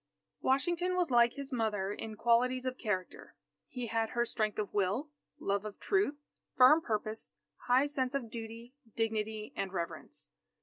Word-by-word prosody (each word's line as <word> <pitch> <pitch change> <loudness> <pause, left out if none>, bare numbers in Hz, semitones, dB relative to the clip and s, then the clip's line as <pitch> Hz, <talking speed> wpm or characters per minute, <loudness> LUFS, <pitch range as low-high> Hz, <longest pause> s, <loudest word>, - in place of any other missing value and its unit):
Washington 345 +7 +1
was 355 -6 +1
like 240 -1 +5
his 280 -1 -7
mother 210 -4 0
in 220 +1 -6
qualities 250 +3 +2
of 255 0 -3
character. 190 -5 -3 0.3
He 250 -2 -5
had 225 0 0
her 240 -1 +1
strength 215 -2 -1
of 210 -2 -3
will, 210 +10 0 0.3
love 200 0 0
of 215 -1 -7
truth, 395 -7 +1 0.4
firm 260 +5 +8
purpose, 215 -3 -3 0.3
high 255 +3 +5
sense 270 -2 -1
of 240 -5 -3
duty, 230 +2 -7 0.2
dignity, 220 -1 -2
and 195 -1 -2
reverence. 170 -3 -5
235 Hz, 150 wpm, -33 LUFS, 215-260 Hz, 0.4 s, firm